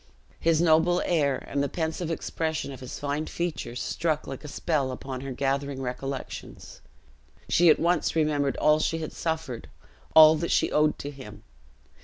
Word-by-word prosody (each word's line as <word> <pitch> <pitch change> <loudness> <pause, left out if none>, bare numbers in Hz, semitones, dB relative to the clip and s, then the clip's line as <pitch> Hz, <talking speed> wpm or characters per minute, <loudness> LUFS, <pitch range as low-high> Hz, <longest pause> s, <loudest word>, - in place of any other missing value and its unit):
His 165 -1 +2
noble 170 +2 +4
air; 145 -6 +1
and 140 - -1
the 140 - 0
pensive 160 0 -3
expression 160 -2 -3
of 135 - -9
his 130 -2 -7
fine 145 +2 -2
features, 160 -8 -4
struck 155 -2 -1
like 135 +1 -7
a - - -7
spell 145 -3 -1
upon 130 0 -6
her 135 0 -5
gathering 140 +1 -1
recollections; 135 +1 -6 0.7
she 175 0 +5
at 155 - +6
once 175 0 +1
remembered 150 -3 +1
all 150 0 +4
she 165 +1 0
had 160 -1 -5
suffered, 160 - -4 0.5
all 155 0 +9
that 170 +2 -2
she - - +2
owed 150 0 +2
to 145 - -6
him. 105 -7 -11
150 Hz, 165 wpm, -27 LUFS, 135-160 Hz, 0.7 s, all